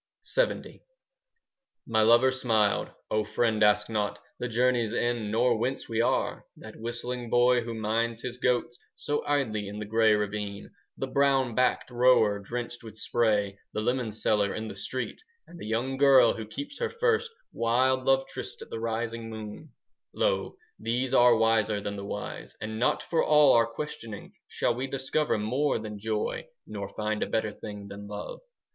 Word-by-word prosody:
LXX -, -, -1 dB, 1.0 s
My 110 Hz, -1 st, +2 dB
lover 120 Hz, +4 st, +6 dB
smiled, 110 Hz, -5 st, +1 dB, 0.2 s
"O 110 Hz, 0 st, +2 dB
friend, 110 Hz, -1 st, 0 dB
ask 105 Hz, 0 st, +4 dB
not 105 Hz, -2 st, -2 dB, 0.2 s
The 125 Hz, -, -2 dB
journey's 120 Hz, -1 st, +1 dB
end, 120 Hz, -3 st, 0 dB
nor 120 Hz, +1 st, +2 dB
whence 130 Hz, +4 st, -2 dB
we 115 Hz, 0 st, 0 dB
are. 120 Hz, -, 0 dB
That 110 Hz, -, -11 dB
whistling 120 Hz, +1 st, -5 dB
boy 120 Hz, +1 st, +4 dB
who 115 Hz, 0 st, -5 dB
minds 115 Hz, +1 st, -1 dB
his 125 Hz, -1 st, -4 dB
goats 120 Hz, -1 st, 0 dB, 0.2 s
So 145 Hz, 0 st, -2 dB
idly 110 Hz, -8 st, 0 dB
in 105 Hz, +1 st, -7 dB
the 105 Hz, -, -4 dB
grey 110 Hz, 0 st, +4 dB
ravine, 105 Hz, -1 st, -4 dB, 0.3 s
"The -, -, -2 dB
brown 135 Hz, -2 st, +2 dB
backed 125 Hz, +1 st, +1 dB
rower 120 Hz, -4 st, +4 dB
drenched 120 Hz, +3 st, -5 dB
with 110 Hz, -1 st, -10 dB
spray, 105 Hz, -3 st, +1 dB
5 100 Hz, -, -26 dB
The 105 Hz, -, -1 dB
lemon 120 Hz, 0 st, 0 dB
seller 105 Hz, -1 st, +1 dB
in 110 Hz, 0 st, -4 dB
the 105 Hz, -, -7 dB
street, 130 Hz, -, -5 dB, 0.2 s
And 175 Hz, -, -13 dB
the -, -, -7 dB
young 120 Hz, +4 st, -1 dB
girl 135 Hz, -4 st, +6 dB
who 110 Hz, -2 st, -7 dB
keeps 285 Hz, -, -7 dB
her 470 Hz, -, 0 dB
first 460 Hz, -1 st, +1 dB, 0.2 s
Wild 130 Hz, +3 st, +2 dB
love 135 Hz, 0 st, +3 dB
tryst -, -, -7 dB
at -, -, -16 dB
the -, -, -4 dB
rising 115 Hz, 0 st, -3 dB
moon,— 110 Hz, +7 st, -8 dB, 0.5 s
"Lo, -, -, 0 dB, 0.2 s
these 125 Hz, +3 st, -1 dB
are 120 Hz, -2 st, +6 dB
wiser 110 Hz, -2 st, +2 dB
than 100 Hz, 0 st, -4 dB
the 100 Hz, -, -6 dB
wise. 105 Hz, +1 st, -6 dB
And 110 Hz, 0 st, -5 dB
not 125 Hz, -, +1 dB
for 165 Hz, -, +1 dB
all 150 Hz, -2 st, +6 dB
our 115 Hz, -1 st, +4 dB
questioning 115 Hz, -5 st, -7 dB
10 -, -, -38 dB
Shall -, -, 0 dB
we 130 Hz, +3 st, -3 dB
discover 135 Hz, +1 st, 0 dB
more 130 Hz, +8 st, 0 dB
than 105 Hz, -2 st, -6 dB
joy, 110 Hz, -, -2 dB, 0.2 s
Nor 100 Hz, -2 st, -5 dB
find 105 Hz, 0 st, -2 dB
a -, -, 0 dB
better 110 Hz, -1 st, 0 dB
thing 105 Hz, -1 st, -8 dB
than 100 Hz, +1 st, -9 dB
love! 105 Hz, 0 st, -6 dB
115 Hz, 175 wpm, -28 LUFS, 105-125 Hz, 1.0 s, lover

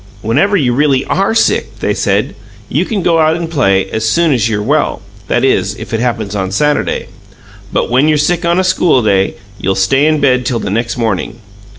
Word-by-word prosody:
"Whenever 150 Hz, -, +2 dB
you 125 Hz, -7 st, +1 dB
really 140 Hz, 0 st, +1 dB
ARE 195 Hz, +3 st, 0 dB
sick," -, -, +1 dB
they -, -, 0 dB
said, -, -, 0 dB, 0.4 s
"you -, -, 0 dB
can 205 Hz, -5 st, -3 dB
go 165 Hz, -1 st, +2 dB
out 160 Hz, 0 st, +3 dB
and 170 Hz, -1 st, -5 dB
play 95 Hz, -, +1 dB
as 110 Hz, -, -2 dB
soon 165 Hz, +6 st, +2 dB
as 115 Hz, -3 st, +1 dB
you're 105 Hz, -1 st, -1 dB
well 145 Hz, +6 st, 0 dB, 0.3 s
that -, -, 0 dB
is, -, -, +1 dB
if -, -, -9 dB
it 115 Hz, -, 0 dB
happens 115 Hz, -4 st, -2 dB
on 95 Hz, -2 st, -2 dB
Saturday. 150 Hz, +9 st, 0 dB, 0.7 s
But -, -, -1 dB
when 130 Hz, +5 st, +3 dB
you're 155 Hz, -1 st, +3 dB
sick 170 Hz, +4 st, 0 dB
on 170 Hz, +1 st, +1 dB
a -, -, +2 dB
school 180 Hz, -8 st, +2 dB
day, 95 Hz, -2 st, +1 dB, 0.2 s
you'll 95 Hz, -1 st, -1 dB
stay 135 Hz, +10 st, +2 dB
in 155 Hz, -1 st, +2 dB
bed 130 Hz, -3 st, +2 dB
till 120 Hz, -1 st, -1 dB
the 105 Hz, -, -4 dB
next 115 Hz, +4 st, -2 dB
morning. 110 Hz, -1 st, -2 dB
130 Hz, 210 wpm, -13 LUFS, 110-160 Hz, 0.7 s, out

